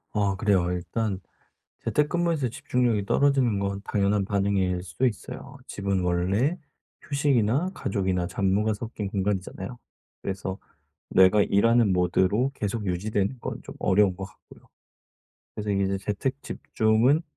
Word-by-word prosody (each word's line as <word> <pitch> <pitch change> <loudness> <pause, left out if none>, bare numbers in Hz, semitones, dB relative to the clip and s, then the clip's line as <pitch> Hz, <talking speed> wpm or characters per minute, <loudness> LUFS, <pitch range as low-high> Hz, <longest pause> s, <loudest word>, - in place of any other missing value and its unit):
아 100 -2 +2
그래요. 95 -3 +2
일단 95 +3 -2 0.6
재택근무에서 155 -3 +1
집중력이 120 -3 0
떨어지는 130 -4 +2
건 100 0 -2
당연한 100 -1 +1
반응일 95 -2 +1
수도 90 +8 -3
있어요. 130 +4 -5
집은 100 -2 -1
원래 95 - +1 0.5
휴식이나 140 - +1
가족이나 95 -4 -1
잡무가 100 +3 +1
섞인 105 -1 -5
공간이잖아요. 95 +2 -3 0.5
그래서 95 0 -3 0.5
내가 95 +2 +6
일하는 115 0 +3
모드로 95 +8 +2
계속 105 0 -3
유지되는 100 +6 -1
건 - - -5
좀 - - -10
어려운 95 -1 +3
것 95 - -7
같고요. 95 - -18 0.9
그래서 105 -1 -3
이제 100 0 +1
재택 130 +8 -3
집중은 115 +8 +2
100 Hz, 315 characters per minute, -26 LUFS, 95-120 Hz, 0.9 s, 내가